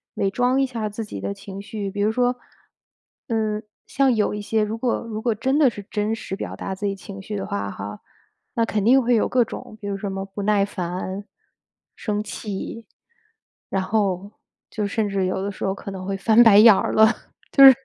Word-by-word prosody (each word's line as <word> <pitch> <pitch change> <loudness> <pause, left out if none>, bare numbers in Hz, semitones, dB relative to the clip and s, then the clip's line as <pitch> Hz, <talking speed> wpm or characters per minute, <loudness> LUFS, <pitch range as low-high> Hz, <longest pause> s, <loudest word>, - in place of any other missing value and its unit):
伪 195 - +1
装 250 +4 +2
一 270 - +3
下 230 -4 -3
自 220 +2 -5
己 150 - -7
的 100 0 -2
情 195 - -9
绪。 200 -1 -5
比 205 +1 -3
如 210 - +3
说， 245 +2 +1 0.9
嗯， 215 -2 0 0.3
像 270 -1 +3
有 210 - +1
一 210 - -4
些 215 +1 +1
如 215 +2 -3
果 240 +1 0
如 220 -2 -5
果 230 -2 +1
真 265 +7 +1
的 280 - +6
是 205 -3 -8
真 210 +1 -1
实 195 - -5
表 - - -5
达 195 - -4
自 205 +2 -5
己 195 - -1
情 195 0 -9
绪 210 +2 -6
的 - - -3
话 100 0 -2
哈， 105 +2 -7 0.6
那 230 - +2
肯 210 -2 -1
定 260 +3 +6
会 245 - +2
有 215 - +2
各 245 -2 +3
种， 215 - -9
比 205 - -5
如 200 - -2
说 195 - -13
什 - - -4
么 195 0 -4
不 195 +1 -7
耐 205 -1 +3
烦、 185 +1 -4 0.7
生 210 -1 -2
气， 215 +2 -6 0.8
然 190 -1 0
后 200 -1 0 0.4
就 210 -2 -2
甚 210 +1 0
至 195 -1 0
有 185 +1 -1
的 200 - -2
时 - - -8
候 195 - 0
可 200 - -7
能 190 -1 -6
会 195 - -1
翻 220 +4 +5
白 210 -3 +7
眼 215 0 +10
儿 - - 0
了， 220 - +7 0.5
就 275 - +7
是， 265 - +13
210 Hz, 240 characters per minute, -23 LUFS, 195-225 Hz, 0.9 s, 是